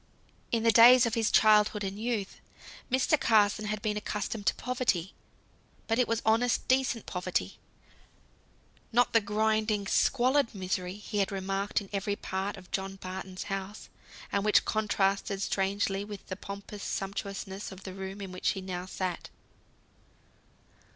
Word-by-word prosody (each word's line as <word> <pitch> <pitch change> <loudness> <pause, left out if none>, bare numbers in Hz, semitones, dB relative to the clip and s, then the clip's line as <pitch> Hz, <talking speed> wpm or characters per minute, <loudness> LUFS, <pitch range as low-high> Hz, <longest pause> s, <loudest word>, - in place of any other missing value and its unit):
In 230 -1 +1
the 230 - +5
days 245 +2 +8
of 230 - -1
his 225 -1 +1
childhood 210 -1 +4
and 195 +1 -4
youth, 220 -4 -3 0.5
Mr. 265 +4 +3
Carson 215 -1 +3
had 210 0 -3
been 210 -1 0
accustomed 210 0 -4
to - - +3
poverty; 245 -8 -1 0.7
but 225 +1 +1
it 250 - +3
was 230 -1 -1
honest, 230 +2 +2
decent 255 -3 +1
poverty; 180 - -3 1.3
not 245 +1 +3
the 230 - +5
grinding 215 0 0
squalid 255 +3 +2
misery 185 -1 -3
he 210 0 -4
had 200 +1 +1
remarked 195 +1 -1
in 195 - -11
every 200 +1 -1
part 195 +1 -4
of 185 -2 -14
John 195 0 -3
Barton's 185 0 -6
house, 195 +1 -5 0.4
and 200 - 0
which 210 0 +4
contrasted 200 -2 0
strangely 195 0 0
with 205 -1 -9
the 185 - -3
pompous 200 +1 -8
sumptuousness 195 0 -4
of 190 0 -11
the 190 - -7
room 195 +1 -7
in 195 -2 -6
which 185 - 0
he 195 - -6
now 185 -1 -5
sat. 185 -2 -4
205 Hz, 150 wpm, -29 LUFS, 195-220 Hz, 1.3 s, days